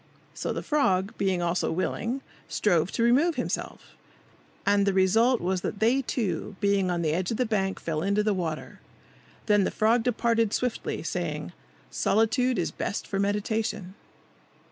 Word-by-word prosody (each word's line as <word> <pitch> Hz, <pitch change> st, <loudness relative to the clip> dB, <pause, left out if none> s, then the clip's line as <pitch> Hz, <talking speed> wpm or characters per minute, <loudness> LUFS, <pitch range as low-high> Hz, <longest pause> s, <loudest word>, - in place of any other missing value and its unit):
So -, -, -3 dB
the -, -, -4 dB
frog, 200 Hz, -, +1 dB
being 190 Hz, -3 st, +1 dB
also 175 Hz, +1 st, 0 dB
willing, 230 Hz, +9 st, -2 dB, 0.3 s
strove 175 Hz, -3 st, +1 dB
to 230 Hz, -, +1 dB
remove 285 Hz, +8 st, +4 dB
himself, 245 Hz, -, -4 dB, 0.7 s
and 200 Hz, 0 st, +3 dB
the 200 Hz, -, +3 dB
result 225 Hz, +6 st, +4 dB
was 185 Hz, +1 st, -1 dB
that -, -, -3 dB
they 235 Hz, +5 st, +3 dB
two, 205 Hz, -6 st, -2 dB
being 200 Hz, -2 st, +2 dB
on 175 Hz, -1 st, -1 dB
the 155 Hz, -, +1 dB
edge 175 Hz, +3 st, -1 dB
of 225 Hz, -, -2 dB
the 255 Hz, -, +1 dB
bank, 195 Hz, -4 st, -1 dB
fell 155 Hz, -2 st, -2 dB
into 200 Hz, +3 st, +1 dB
the 210 Hz, -1 st, +2 dB
water. 165 Hz, -5 st, -4 dB, 0.7 s
Then 205 Hz, -2 st, +4 dB
the -, -, +1 dB
frog 225 Hz, +2 st, +2 dB
departed 230 Hz, -2 st, +1 dB
swiftly, 250 Hz, -2 st, -2 dB
saying, -, -, -3 dB, 0.4 s
"Solitude 230 Hz, +4 st, +2 dB
is 175 Hz, -, -1 dB
best 200 Hz, -, -3 dB
for 195 Hz, -, -3 dB
meditation." 205 Hz, -1 st, -1 dB
205 Hz, 160 wpm, -27 LUFS, 185-230 Hz, 0.7 s, remove